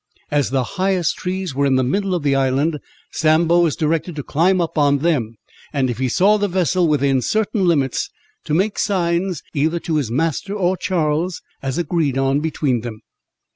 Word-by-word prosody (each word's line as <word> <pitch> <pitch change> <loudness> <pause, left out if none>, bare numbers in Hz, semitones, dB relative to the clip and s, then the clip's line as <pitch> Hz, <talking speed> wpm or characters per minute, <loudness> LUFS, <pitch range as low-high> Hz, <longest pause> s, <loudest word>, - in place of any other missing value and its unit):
As 145 -3 +1
the 130 0 +1 0.2
highest 185 -4 +1
trees 185 -3 -3
were 140 +1 +1
in 135 - +2
the 130 - +2
middle 195 +8 0
of 170 - -3
the 140 -1 +2
island, 135 +3 +1 0.3
Sambo 165 +2 +3
was 170 -4 +2
directed 165 +1 -1
to 145 - -4
climb 180 +7 +2
up 170 -2 -2
on 145 -2 +3
them, 135 -8 0 0.4
and 135 -4 0
if 120 - -6
he 130 -1 0
saw 200 - +4
the 205 0 0
vessel 180 -1 +1
within 140 -3 +2
certain 215 - 0
limits, 140 -7 +1 0.4
to 150 - 0
make 200 +5 0
signs, 175 -3 0
either 160 +4 +1
to 160 -2 -1
his 140 -7 -1
master 165 - -1
or 185 -2 +1
Charles, 170 -3 -1 0.2
as 135 +2 -3
agreed 160 -5 0
on 135 +1 +2
between 145 -5 -1
them. 110 -2 -8
160 Hz, 185 wpm, -20 LUFS, 135-180 Hz, 0.4 s, saw